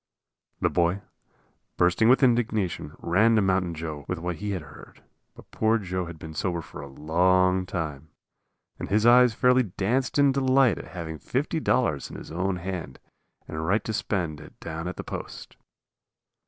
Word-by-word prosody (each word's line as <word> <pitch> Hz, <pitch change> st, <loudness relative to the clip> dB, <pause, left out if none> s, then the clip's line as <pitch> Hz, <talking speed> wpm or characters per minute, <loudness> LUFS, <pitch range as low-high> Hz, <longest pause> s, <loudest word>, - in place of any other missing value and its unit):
The -, -, +3 dB
boy, 85 Hz, +3 st, +1 dB, 0.7 s
bursting 90 Hz, +6 st, +3 dB
with 130 Hz, +2 st, +5 dB
indignation, 110 Hz, -, +1 dB
ran 110 Hz, +7 st, +3 dB
to 110 Hz, -, +4 dB
Mountain 95 Hz, -3 st, +1 dB
Joe 80 Hz, -2 st, -6 dB
with 90 Hz, -, -2 dB
what 85 Hz, 0 st, -4 dB
he 105 Hz, +5 st, -4 dB
had 95 Hz, -5 st, -3 dB
heard. 70 Hz, -, -15 dB, 0.3 s
But -, -, -16 dB
poor 110 Hz, +1 st, +2 dB
Joe 95 Hz, -3 st, -3 dB
had 85 Hz, -1 st, -8 dB
been 80 Hz, 0 st, -9 dB
sober 85 Hz, +2 st, -1 dB
for 80 Hz, -, -10 dB
a 70 Hz, -, -8 dB
long 90 Hz, +6 st, +2 dB
time, 80 Hz, -5 st, -4 dB, 0.7 s
and -, -, -5 dB
his 105 Hz, +2 st, +2 dB
eyes 120 Hz, -1 st, +6 dB
fairly 125 Hz, 0 st, +4 dB
danced 115 Hz, +6 st, -1 dB
in 140 Hz, -1 st, +5 dB
delight 130 Hz, -, +3 dB
at -, -, -8 dB
having 80 Hz, -2 st, -5 dB
$50 130 Hz, -, 0 dB
in -, -, -8 dB
his -, -, -10 dB
own 95 Hz, +3 st, -1 dB
hand 90 Hz, -6 st, -5 dB, 0.5 s
and 80 Hz, 0 st, -4 dB
right 100 Hz, +7 st, +1 dB
to 110 Hz, -, -3 dB
spend 85 Hz, -8 st, -2 dB
it -, -, -15 dB
down 80 Hz, +1 st, -5 dB
at 90 Hz, -, -4 dB
the -, -, -6 dB
post. -, -, -8 dB
90 Hz, 170 wpm, -26 LUFS, 80-110 Hz, 0.7 s, eyes